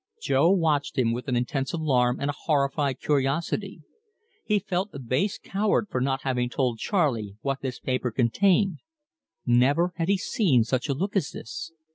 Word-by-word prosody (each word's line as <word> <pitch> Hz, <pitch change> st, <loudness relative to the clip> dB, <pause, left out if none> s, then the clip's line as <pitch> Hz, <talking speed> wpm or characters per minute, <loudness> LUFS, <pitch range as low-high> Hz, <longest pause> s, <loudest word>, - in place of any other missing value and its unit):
Jo 155 Hz, -, +3 dB
watched 160 Hz, -8 st, +1 dB
him 120 Hz, -3 st, +2 dB
with 125 Hz, +3 st, -5 dB
an 125 Hz, -, 0 dB
intense 135 Hz, +2 st, -1 dB
alarm 130 Hz, -6 st, +1 dB
and 140 Hz, -, -1 dB
a -, -, -11 dB
horrified 140 Hz, -2 st, 0 dB
curiosity. 150 Hz, +7 st, -1 dB, 0.6 s
He 210 Hz, -, +2 dB
felt 195 Hz, 0 st, -2 dB
a -, -, -6 dB
base 135 Hz, -, -1 dB
coward 205 Hz, +1 st, 0 dB
for 125 Hz, -, -1 dB
not 135 Hz, +1 st, -1 dB
having 125 Hz, -2 st, 0 dB
told 125 Hz, -3 st, -1 dB
Charley 120 Hz, -, 0 dB
what 135 Hz, -1 st, -2 dB
this 130 Hz, -2 st, -4 dB
paper 130 Hz, -1 st, -1 dB
contained. 180 Hz, -, +2 dB, 0.7 s
Never 140 Hz, +9 st, +3 dB
had 165 Hz, -1 st, -1 dB
he 200 Hz, -, +4 dB
seen 175 Hz, -, +2 dB
such 125 Hz, +4 st, -2 dB
a 140 Hz, -, +1 dB
look 195 Hz, +8 st, -3 dB
as 175 Hz, -5 st, +1 dB
this. 275 Hz, +1 st, -7 dB
140 Hz, 170 wpm, -26 LUFS, 125-180 Hz, 0.7 s, he